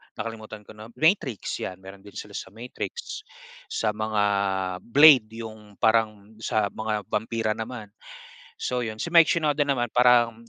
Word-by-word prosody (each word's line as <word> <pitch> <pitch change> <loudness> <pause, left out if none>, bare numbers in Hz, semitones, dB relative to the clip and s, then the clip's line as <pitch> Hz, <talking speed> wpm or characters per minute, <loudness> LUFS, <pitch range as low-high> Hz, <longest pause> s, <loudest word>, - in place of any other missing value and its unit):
nakalimutan 110 -1 -7
ko - - -14
na 110 +1 -11
Matrix, 155 - 0
'yan, 95 - -5
mayro'n 95 +1 -11
din 100 0 -16
sila 105 - -8
sa - - -6
Matrix, 425 - -7 0.4
sa 110 - -1
mga 110 -1 -1 0.6
Blade 135 -1 +6 0.2
'yong 110 -2 -11
parang 110 -1 0
sa 110 -2 0
mga 110 -1 -3
bampira 110 +1 -2
naman. 110 -1 -6 0.7
So 125 0 -2
'yon. 110 -2 -4
Si 170 - -6
Mike 165 -2 +7
Shinoda 150 -3 +1
naman 120 -4 0
parang 120 -2 +3
110 Hz, 150 wpm, -25 LUFS, 105-125 Hz, 0.7 s, Mike